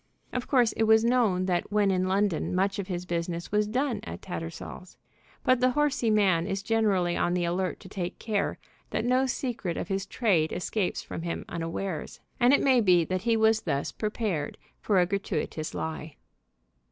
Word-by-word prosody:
Of 250 - -3
course 245 -5 +4
it 225 - 0
was 220 0 +5
known 225 -7 +2
that 180 +1 -1
when 205 -1 +3
in 185 0 +1
London 190 -2 0
much 195 +2 +1
of 195 - -3
his 180 -2 -4
business 170 0 -3
was 210 0 +2
done 250 0 0
at - - -8
Tattersall's. 175 0 -7 0.5
But 255 -1 +4
the 255 0 +4
horsey 290 -5 +1
man 190 -5 +3
is 195 -1 -2
generally 200 -6 +2
on 175 - +1
the 175 -1 0
alert 180 +2 -1
to - - -11
take 185 -2 -4
care 210 -3 -1 0.3
that 220 - -2
no 255 +2 +3
secret 240 -9 -3
of - - -4
his 195 0 -2
trade 185 -11 +1
escapes 185 +1 -2
from - - -6
him 170 0 -4
unawares. 165 0 -4 0.2
And 245 0 +5
it 285 - +4
may 260 -3 +5
be 180 -5 +4
that 185 +1 -2
he 230 +2 +2
was 220 0 +4
thus 140 -4 -2
prepared 210 -8 -2 0.2
for 200 -3 +2
a 180 - +4
gratuitous 175 -5 -3
lie. 160 -1 -5
195 Hz, 185 wpm, -28 LUFS, 175-225 Hz, 0.5 s, was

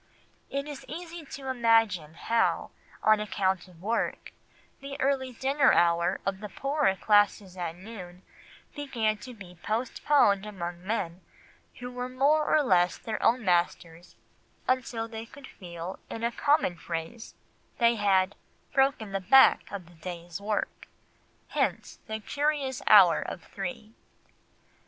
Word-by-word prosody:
It 280 +1 -3
is 290 -2 -7
easy 335 0 -8
to 270 -1 -7
imagine 225 -10 +2
how, 230 +6 0 0.3
on 215 -1 +5
account 190 -3 -1
of 175 -3 -18
work, 230 +3 -2 0.5
the 275 0 -8
early 265 -1 0
dinner 270 +3 +3
hour 170 +2 +3
of 195 -1 -1
the 210 0 -7
poorer 275 -4 0
classes 205 -2 +2
at 170 -2 -4
noon 185 -2 -10 0.5
began 230 -8 -1
to 250 +1 -10
be 180 -5 -13
postponed 225 -2 +2
among 175 -4 -6
men 190 -4 -3 0.5
who 245 0 -7
were 250 0 -4
more 285 +4 +2
or 305 - +4
less 180 -7 +3
their 220 -1 -5
own 240 -1 +2
masters 175 -1 -1 0.5
until 245 -3 -1
they 225 0 -8
could 285 +3 -13
feel, 175 -4 -8
in 225 - -6
a 235 - +1
common 285 - +1
phrase, 165 +7 -6 0.4
they 235 -1 +4
had 195 -2 +2 0.4
"broken 270 -6 +2
the 195 0 -2
back 265 +9 +5
of 200 -3 -6
the 175 - -18
day's 175 +1 -7
work"; 210 0 -3 0.6
hence - - -2
the 220 0 -4
curious 285 +2 -1
hour 190 -5 +7
of 175 - -6
three. 200 +3 -7
215 Hz, 140 wpm, -28 LUFS, 180-255 Hz, 0.6 s, hour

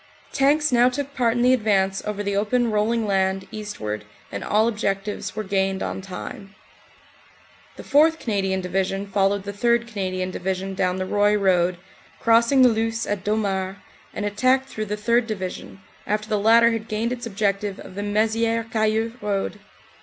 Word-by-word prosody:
Tanks 295 +2 +3
now 245 0 +5
took 280 +2 -4
part 235 -4 +2
in 240 - +2
the 250 +1 +5
advance 195 -5 +1
over 205 -1 -3
the 200 0 -1
open 230 +3 +1
roll 210 +1 +1
ing 230 -1 0
land 190 -1 0
eastward 110 - -5 0.3
and 100 - -5
all 215 +2 +2
objectives 205 -3 -2
were 215 - -3
gained 195 -1 0
on - - -4
time. 195 +1 -8 1.2
The - - -10
4th. 315 +3 +4
Canadian 195 -4 -1
Division 190 +2 -1
followed 200 0 +1
the 200 0 -6
3rd. 235 +3 +1
Canadian 185 -4 -3
Division 190 +1 -3
down 185 -1 0
the 185 0 -2
Roye 205 +2 +2
road, 180 -3 +2 0.4
crossing 235 +3 +4
the - - +8
Luce 225 0 -1
at 205 -2 -3
Domart, 195 -3 -1 0.4
and 205 - -4
attacked 255 +6 +2
through 215 - -4
the 210 0 -3
3rd. 235 +2 +2
Division, 190 -2 -6 0.3
after 215 +1 -1
the 215 -1 0
latter 230 +3 +5
had 225 -1 -3
gained 220 +3 -1
its 240 -1 -6
objective 200 -1 -1
of - - -10
the 200 - -5
Mezieres 225 +2 0
Cayeux 220 +1 0
Road. 205 0 -2
210 Hz, 170 wpm, -23 LUFS, 195-230 Hz, 1.2 s, the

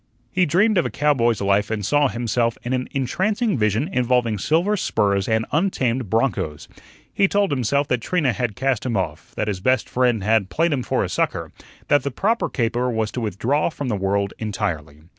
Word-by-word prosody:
He 180 -1 +2
dreamed 195 +6 +3
of - - 0
a - - -5
cowboy's 120 -7 +1
life 100 +1 +2
and 105 -3 -2
saw 145 +5 +3
himself 120 -1 -1
in 125 - -2
an 125 0 -1
entrancing 200 - 0
vision 110 +4 +1
involving 125 - +1
silver 170 - +2
spurs 100 - 0
and 110 0 +1
untamed 130 - 0
bronchos. 100 - -1 0.5
He 195 - +3
told 200 -3 +1
himself 140 +2 +1
that 125 -2 0
Trina 150 -4 +1
had 120 -4 -2
cast 135 -2 0
him 120 -5 -1
off, 85 -4 -4
that 105 - -2
his 100 -3 -2
best 130 +6 +1
friend 120 -5 +1
had 105 -2 +2
"played 165 0 +1
him 135 - -1
for - - 0
a - - -1
sucker," - - -2 0.4
that 145 - +4
the 140 - -2
"proper 210 - 0
caper" 120 0 0
was 110 -2 -1
to 125 - -4
withdraw 115 - 0
from 145 -5 -5
the 110 - 0
world 100 +1 -1
entirely. 80 -8 -3
125 Hz, 195 wpm, -22 LUFS, 105-145 Hz, 0.5 s, that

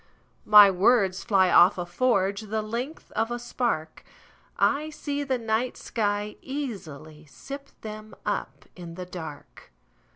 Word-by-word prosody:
My 210 -2 +9
words 190 0 +2
fly 190 -5 +3
off 180 +3 +6
a 175 - -3
forgeThe 210 +1 0
length 245 +8 -5
of 225 +1 -1
a 240 - -3
spark;I 240 - -3
see 290 -2 -4
the 270 -3 -1
night 230 +2 -1
sky 205 -1 -2
easily 160 - -7
sip 275 - -9
themUp 215 -1 -6
in 170 -2 -9
the 180 0 -6
dark. 160 -5 -10
215 Hz, 120 wpm, -26 LUFS, 185-245 Hz, -, My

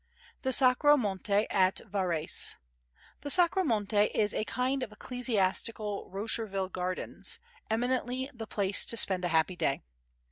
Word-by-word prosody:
The 260 - -2
Sacro 265 +3 +5
Monte 205 -2 -1
at 190 -1 +2
Varese 185 -6 -1 0.7
The 290 - -6
Sacro 360 +4 +5
Monte 210 - +1
is 210 -1 0
a - - -2
kind 255 +3 -2
of 240 -4 -5
ecclesiastical 215 -3 -1
Rosherville 195 -1 -3
Gardens, 180 0 -2 0.3
eminently 250 +3 -2
the 225 -2 -9
place 200 -2 +4
to 230 - +1
spend 185 -4 +3
a - - 0
happy 165 +2 0
day. 140 -5 -2
215 Hz, 135 wpm, -29 LUFS, 190-250 Hz, 0.7 s, Sacro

